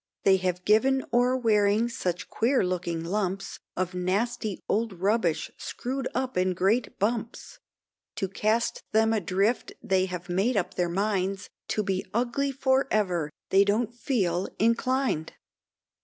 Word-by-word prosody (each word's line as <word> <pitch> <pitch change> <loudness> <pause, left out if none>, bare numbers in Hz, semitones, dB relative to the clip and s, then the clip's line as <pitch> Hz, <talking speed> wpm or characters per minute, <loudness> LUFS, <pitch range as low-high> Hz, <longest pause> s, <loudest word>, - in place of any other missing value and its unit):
They 190 -1 +5
have 180 -1 -2
given 260 +6 +3
o'er 250 +2 +3
wearing 215 -1 +3
such 185 -8 -3
queer 240 -1 +1
looking 170 -2 -2
lumps 195 +2 -2 0.2
Of 185 0 -1
nasty 200 +3 -1
old 225 0 0
rubbish 185 -4 0
screw'd 260 +1 -4
up 260 0 -1
in 185 0 +1
great 205 +5 +1
bumps, 225 +2 -3 0.6
To 195 - -1
cast 215 +4 0
them 220 +1 +4
adrift 200 +3 0
they 190 -4 +2
have 180 -1 -6
made 195 +7 +1
up 185 - -1
their 175 -1 0
minds, 195 +1 -1 0.2
To 215 - 0
be 190 -1 -1
ugly 250 +4 0
for 265 0 +2
ever 180 -7 +1 0.2
they 195 +1 +6
don't 215 +3 0
feel 195 -8 0
inclined. 230 - +1
205 Hz, 140 wpm, -27 LUFS, 185-235 Hz, 0.6 s, they